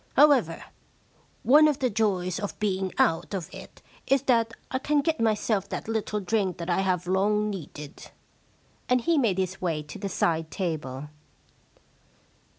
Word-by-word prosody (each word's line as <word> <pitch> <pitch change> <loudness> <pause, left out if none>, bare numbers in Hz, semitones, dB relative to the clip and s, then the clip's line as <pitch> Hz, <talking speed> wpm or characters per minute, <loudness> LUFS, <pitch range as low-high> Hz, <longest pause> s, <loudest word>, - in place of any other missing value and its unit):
However, 265 - +4 0.8
one 295 +7 +7
of 295 -3 +1
the 255 -2 0
joys 190 -4 0
of 205 - -5
being 190 -2 -1
out 165 +4 +1
of 180 -4 -6
it - - -12 0.2
is 270 0 +3
that 230 -4 +2 0.2
I 260 - 0
can 295 +2 +1
get 320 +2 -1
myself 215 -3 0
that - - -5
little 220 -1 -2
drink 195 -1 -1
that 170 +1 -3
I 175 - +2
have 185 -2 0
long 210 +3 +1
needed.' 150 -5 -9 0.8
And 250 0 +3
he 330 +5 +2
made 215 -8 +1
jiis 190 0 -2
way 165 -4 -1
to 150 - -10
the 200 0 -3
side 165 -3 0
table. 150 -7 -4
200 Hz, 155 wpm, -26 LUFS, 180-230 Hz, 0.8 s, one